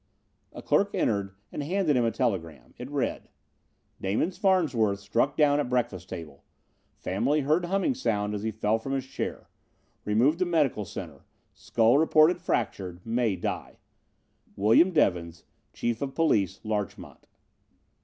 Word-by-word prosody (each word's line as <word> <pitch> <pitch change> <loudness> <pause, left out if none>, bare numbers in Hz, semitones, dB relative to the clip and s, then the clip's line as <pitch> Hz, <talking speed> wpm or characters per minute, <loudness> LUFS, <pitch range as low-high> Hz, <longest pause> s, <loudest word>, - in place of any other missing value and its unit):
A - - -10
clerk - - +2
entered 100 -2 0 0.2
and - - -4
handed 165 0 +1
him 125 - +3
a 115 - +2
telegram. 95 - -3
It - - -7
read: - - -2 0.7
"Damon 105 - 0
Farnsworth 160 - +1
struck 115 +8 0
down 145 -1 +4
at 145 - -1
breakfast 115 -8 -1
table. 80 -6 -8 0.5
Family 120 +11 0
heard 155 +5 +1
humming 195 +9 +1
sound 105 - -1
as 105 - -3
he 110 - -1
fell 110 +1 0
from 135 +4 -4
his 135 -1 -2
chair. 130 - -5 0.6
Removed 125 +10 +2
to 185 - +2
Medical 150 - +1
Center. - - -8 0.3
Skull 115 +4 +2
reported 160 +2 +4
fractured. 90 -2 -3
May 115 -2 0
die. 90 - -5 0.8
"William 110 - +5
Devins, 85 - 0 0.3
Chief 120 -1 -2
of 135 -1 -4
Police, 100 - +1
Larchmont." 105 -2 -5
115 Hz, 140 wpm, -27 LUFS, 100-150 Hz, 0.8 s, William